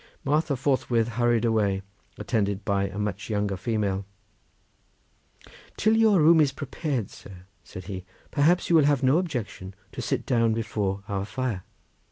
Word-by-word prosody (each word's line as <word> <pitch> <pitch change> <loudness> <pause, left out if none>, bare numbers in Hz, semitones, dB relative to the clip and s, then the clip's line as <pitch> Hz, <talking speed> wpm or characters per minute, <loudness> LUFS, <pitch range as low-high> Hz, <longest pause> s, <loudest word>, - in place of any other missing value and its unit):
Martha 150 +1 +1
forthwith 120 -3 +1
hurried 120 0 +1
away, 100 -4 +1 0.3
attended 100 -3 -1
by 100 -1 +1
a 95 +1 -8
much 105 0 -3
younger 105 -2 0
female. 100 -1 -1 1.7
"Till 215 +2 +3
your 220 -4 +5
room 160 +1 +6
is 145 -3 +3
prepared, 140 - -3
sir," 95 -2 -13 0.2
said 95 - -9
he, 95 -1 -6 0.3
"perhaps 160 +5 +3
you 170 - +3
will 155 -3 +6
have 145 -3 +2
no 135 +6 +4
objection 115 - -5 0.2
to - - -6
sit - - -2
down 115 -3 +2
before 105 -3 -2
our 100 -2 -2
fire?" 115 -2 -3
115 Hz, 150 wpm, -26 LUFS, 100-140 Hz, 1.7 s, room